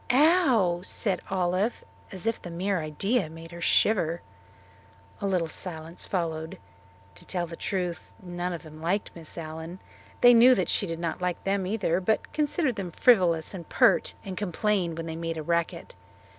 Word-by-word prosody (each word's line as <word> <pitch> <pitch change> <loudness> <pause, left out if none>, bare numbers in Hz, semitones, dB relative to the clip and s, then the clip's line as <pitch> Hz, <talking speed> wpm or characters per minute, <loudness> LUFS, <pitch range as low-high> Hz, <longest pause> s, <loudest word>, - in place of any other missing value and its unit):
"Ow!" 255 - +4
said 190 -1 -1
Olive, 185 +4 0 0.3
as 190 0 -5
if 225 0 0
the 175 - -7
mere 185 +2 -1
idea 190 +6 0
made 165 +1 -11
her 170 0 -9
shiver. 170 -3 +2 1.0
A 200 - 0
little 180 -4 +1
silence 165 0 -5
followed. 160 -3 -2 0.6
To - - -10
tell 175 -2 -1
the 165 0 -8
truth, 180 -1 -3
none 175 0 -4
of 170 -3 -6
them 155 -1 -12
liked 185 +5 -1
Miss 165 -1 -9
Allen. 160 +2 -6 0.4
They 245 0 +9
knew 245 +2 +8
that - - 0
she 200 - +1
did 165 -1 -4
not 170 +1 -3
like 180 -1 -2
them 195 -1 0
either, 190 -4 0
but 215 +4 0
considered 295 -4 0
them 190 -3 -3
frivolous 175 -6 +3
and 175 -4 -8
pert, - - +3
and 190 -1 -5
complained 185 -2 0
when 165 - -4
they 160 -1 -5
made 165 0 -3
a 155 - -4
racket. 170 +1 -1
180 Hz, 170 wpm, -27 LUFS, 165-200 Hz, 1.0 s, They